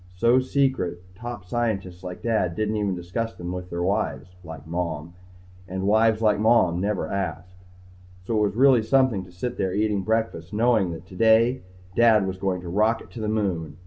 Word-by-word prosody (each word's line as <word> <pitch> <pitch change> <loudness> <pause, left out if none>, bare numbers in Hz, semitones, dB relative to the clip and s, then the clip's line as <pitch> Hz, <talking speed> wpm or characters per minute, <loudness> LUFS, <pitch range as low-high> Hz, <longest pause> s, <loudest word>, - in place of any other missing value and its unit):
So 115 +7 +4
secret 130 -10 0
top 120 -2 -7
scientists 95 -5 -2
like 90 -1 -7
Dad 110 -7 0
didn't 110 +2 -1
even 100 -3 0
discuss 95 +6 -4
them 90 0 -6
with 90 0 -6
wives 90 +2 -1
like 80 -3 -9
Mom. 85 -1 -4 0.5
And 95 +1 -4
wives 110 +2 +3
like 105 -1 +3
Mom 105 -6 +3
never 105 0 -1
asked. 90 0 -5 0.6
So 115 - -1
it 105 -1 +3
was 100 - -6
really 130 -1 +5
something 125 -4 +2
to 90 - -16
sit 120 +8 -5
there 95 -1 -1
eating 105 -1 +1
breakfast 110 -5 -2
knowing 110 -3 +2
that, 80 +1 -9
today, 115 +6 +3 0.3
Dad 110 -4 +5
was 95 -1 -4
going 95 -2 -1
to 90 - -9
rocket 110 +6 0
to 120 - -9
the 110 - -2
Moon. 90 -8 -2
100 Hz, 175 wpm, -24 LUFS, 90-115 Hz, 0.6 s, really